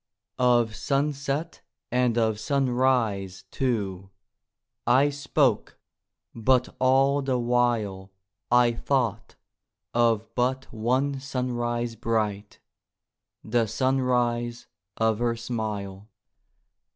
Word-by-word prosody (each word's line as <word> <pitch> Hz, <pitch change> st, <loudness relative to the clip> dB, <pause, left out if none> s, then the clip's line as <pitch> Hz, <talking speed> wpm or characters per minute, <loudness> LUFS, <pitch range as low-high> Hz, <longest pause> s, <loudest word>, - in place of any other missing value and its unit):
Of 120 Hz, -3 st, +3 dB
sunset 140 Hz, +2 st, -2 dB, 0.3 s
and 125 Hz, -1 st, +2 dB
of 110 Hz, -2 st, +1 dB
sunrise, 125 Hz, -7 st, 0 dB
too, 100 Hz, -7 st, -2 dB, 0.8 s
I 135 Hz, +4 st, +4 dB
spoke, 140 Hz, -4 st, 0 dB, 0.6 s
but 125 Hz, +2 st, +1 dB
all 135 Hz, +2 st, +3 dB
the 135 Hz, -2 st, 0 dB
while 120 Hz, -6 st, 0 dB, 0.4 s
I 120 Hz, 0 st, +5 dB
thought 115 Hz, -3 st, -1 dB, 0.6 s
of 115 Hz, -2 st, +1 dB
but 130 Hz, +2 st, 0 dB
one 130 Hz, +5 st, 0 dB
sunrise 120 Hz, -3 st, -2 dB
bright— 110 Hz, -2 st, -2 dB, 0.8 s
The 115 Hz, 0 st, +1 dB
sunrise 120 Hz, -1 st, 0 dB, 0.3 s
of 110 Hz, -1 st, +1 dB
her 120 Hz, -1 st, +1 dB
smile. 105 Hz, -4 st, -5 dB
120 Hz, 85 wpm, -26 LUFS, 110-130 Hz, 0.8 s, I